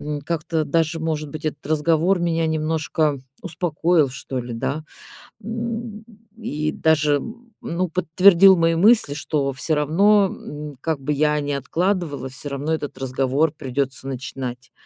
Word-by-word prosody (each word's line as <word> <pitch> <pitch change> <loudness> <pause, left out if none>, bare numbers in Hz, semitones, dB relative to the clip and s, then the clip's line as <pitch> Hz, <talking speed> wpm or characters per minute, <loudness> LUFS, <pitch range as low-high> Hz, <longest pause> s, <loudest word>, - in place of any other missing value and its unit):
М, 150 -1 -4
как-то 160 0 -1
даже, 165 +2 0
может 155 -2 -2
быть, 155 +2 -8
этот 145 -2 -4
разговор 160 +4 +2
меня 165 -1 +1
немножко 155 -2 0 0.2
успокоил, 165 -3 +1
что 135 0 -5
ли, 120 -1 -6
да? 140 +7 -2 0.6
М, 230 0 -5 0.3
и 155 -9 -2
даже, 155 -2 +2
м, 230 - -9
ну, 180 +2 -2
подтвердил 185 +3 +6
мои 165 0 +3
мысли, 205 -3 +4
что 145 -1 -1
всё 155 +5 0
равно, 195 +8 +4
м, 150 -1 -8
как 160 -3 -1
бы 150 +3 -2
я 150 +1 +2
ни 145 0 -3
откладывала, 155 -1 -1
всё 135 +2 -7
равно 145 +3 -2
этот 145 -4 -4
разговор 135 +3 0
придётся 135 0 -3
начинать. 130 -1 -6
155 Hz, 145 wpm, -22 LUFS, 140-170 Hz, 0.6 s, подтвердил